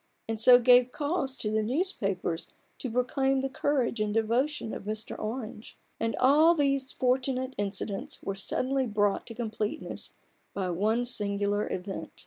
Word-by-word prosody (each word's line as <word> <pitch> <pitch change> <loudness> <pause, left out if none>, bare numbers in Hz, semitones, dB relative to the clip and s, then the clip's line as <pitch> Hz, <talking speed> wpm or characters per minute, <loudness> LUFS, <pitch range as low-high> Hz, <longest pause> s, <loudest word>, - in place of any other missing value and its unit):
43 225 - -2
and 220 - -5
so 245 +2 +8
gave 250 0 +5
cause 285 -2 -2
to 210 - -1
the 220 0 +1
newspapers 210 - -1 0.3
to 255 - -3
proclaim 265 +3 +1
the 270 - -1
courage 265 -4 0
and 210 0 -1
devotion 230 +3 0
of - - -7
Mr. 215 +1 -4
Orange. 220 0 -6 0.2
And 225 0 -1
all 305 +6 +6
these 275 -3 +1
fortunate 255 +1 0
incidents 200 0 -3
were 195 - -2
suddenly 255 +7 0
brought 205 -2 0
to 230 - -7
completeness 220 -2 -4 0.4
by 185 -2 -1
one 215 +7 +1
singular 205 -3 0
event. 190 +1 -5
235 Hz, 150 wpm, -28 LUFS, 210-265 Hz, 0.4 s, so